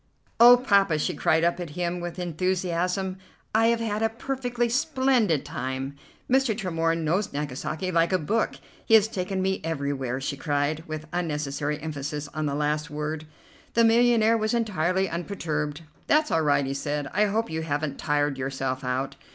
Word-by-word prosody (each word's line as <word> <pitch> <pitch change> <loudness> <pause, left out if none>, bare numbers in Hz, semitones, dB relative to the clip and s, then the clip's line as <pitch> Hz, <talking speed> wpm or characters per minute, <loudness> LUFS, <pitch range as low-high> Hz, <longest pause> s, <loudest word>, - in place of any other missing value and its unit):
"Oh, 240 +1 +10
Poppa!" 200 -9 +3
she 150 - -1
cried 160 +1 +2
up 170 +1 +1
at 170 -3 -7
him 175 0 -1
with 175 0 -5
enthusiasm, 180 +1 -1 0.3
"I 225 +1 +4
have 235 0 +2
had 215 -1 -1
a 225 - +3
perfectly 245 0 -2
splendid 260 - +2
time. 135 -2 -4 0.3
Mr. 260 -4 +2
Tremorne 165 -4 0
knows 185 +6 0
Nagasaki 150 +5 -3
like 165 0 +2
a 185 - +4
book. 210 +8 0 0.3
He 225 - +5
has 215 -1 +6
taken 190 -2 -2
me 190 0 0
everywhere," 140 -5 -2
she 140 +1 -3
cried, 145 +2 -1
with 155 0 -5
unnecessary 150 -3 -2
emphasis 150 -1 -4
on 155 -1 -1
the 140 - -1
last 150 +1 -1
word. 150 +1 -4 0.5
The 230 - +5
millionaire 230 -1 +4
was 220 +2 0
entirely 190 -4 +1
unperturbed. 160 -4 -3 0.2
"That's 305 +1 +3
all 165 - +3
right," 145 -2 +2
he 135 - -2
said. 145 +1 -2
"I 210 +4 +3
hope 220 +1 -1
you 160 0 -2
haven't 145 -2 -2
tired 145 -2 0
yourself 130 0 -3
out." 130 +2 -2
165 Hz, 165 wpm, -26 LUFS, 150-210 Hz, 0.5 s, Oh